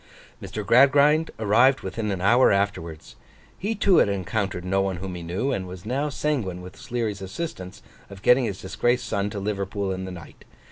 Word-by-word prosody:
Mr. 105 -1 -6
Gradgrind 140 +7 +5
arrived 120 +5 +4
within 105 +3 -4
an 95 -3 -2
hour 120 +7 +5
afterwards. 100 -6 -2 0.4
He 215 +4 -3
too 195 -3 +3
had - - +4
encountered 100 -1 -2
no 95 +1 +1
one 95 -1 -1
whom 95 +1 -6
he 90 - -6
knew; 90 +11 -2
and 95 -7 -3
was 90 +1 -10
now 135 +6 -1
sanguine 130 -12 -2
with 90 0 -11
Sleary's 110 -5 -4
assistance, 95 - -6 0.3
of 100 -1 -12
getting 125 0 +5
his 100 -4 -4
disgraced 120 +6 0
son 100 -1 -1
to 105 - -7
Liverpool 100 -1 -2
in 95 0 -4
the 95 - -6
night. 85 -3 -12
100 Hz, 185 wpm, -24 LUFS, 95-125 Hz, 0.4 s, Gradgrind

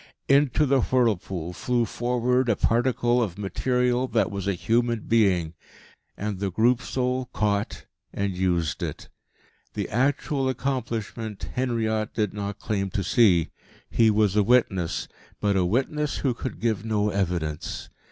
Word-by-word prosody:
Into 140 +1 +4
the 135 -1 +3
whirlpool 95 -9 0
flew 120 +4 0
forward 125 +2 0
a 110 - +3
particle 120 +1 +2
of 100 -6 -2
material 125 +5 0
that - - +1
was 100 -1 -4
a 100 - +1
human 115 +4 +1
being. 95 -9 +2 0.6
And 100 -2 -3
the 100 -1 -1
Group 115 +6 +2
Soul 130 -1 -1
caught 105 -3 -2 0.3
and 100 -2 -2
used 90 -3 0
it. - - -5 0.7
The 105 -2 -2
actual 135 +3 0
accomplishment 115 -5 -3
Henriot 110 -4 -1
did 105 -3 0
not 100 -1 -4
claim 100 -2 -2
to 100 +1 -2
see. 90 -5 +3 0.4
He 115 -1 +4
was 105 -2 +2
a 105 - +5
witness, 105 -6 +1 0.3
but 100 -1 +1
a 95 -2 +2
witness 135 +9 0
who 135 -3 0
could 125 +1 -6
give 110 -3 0
no 105 -2 0
evidence. 85 -6 -2
110 Hz, 140 wpm, -25 LUFS, 100-125 Hz, 0.7 s, a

